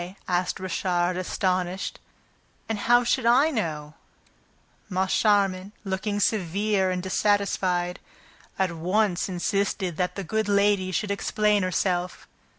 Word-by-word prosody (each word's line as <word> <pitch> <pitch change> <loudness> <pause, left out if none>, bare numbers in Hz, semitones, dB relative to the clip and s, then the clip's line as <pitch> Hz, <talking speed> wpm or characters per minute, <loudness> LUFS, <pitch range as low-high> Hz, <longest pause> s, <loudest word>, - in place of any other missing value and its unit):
asked 180 0 0
Richard, 180 -1 -1
astounded. 185 0 -2 0.7
"And 225 -2 -2
how 240 +3 +4
should 240 0 +1
I 270 +7 +5
know?" 155 - -3 1.0
Moncharmin, 195 0 +1
looking 205 +1 -2
severe 200 0 +1
and 180 -1 -2
dissatisfied, 185 -2 0 0.6
at 190 -2 +1
once 180 +3 0
insisted 185 -1 -1
that 180 -1 -1
the 195 - -4
good 220 +3 -1
lady 200 -2 +2
should 205 +2 -1
explain 210 +1 +1
herself. 180 0 -1
190 Hz, 110 wpm, -25 LUFS, 180-205 Hz, 1.0 s, I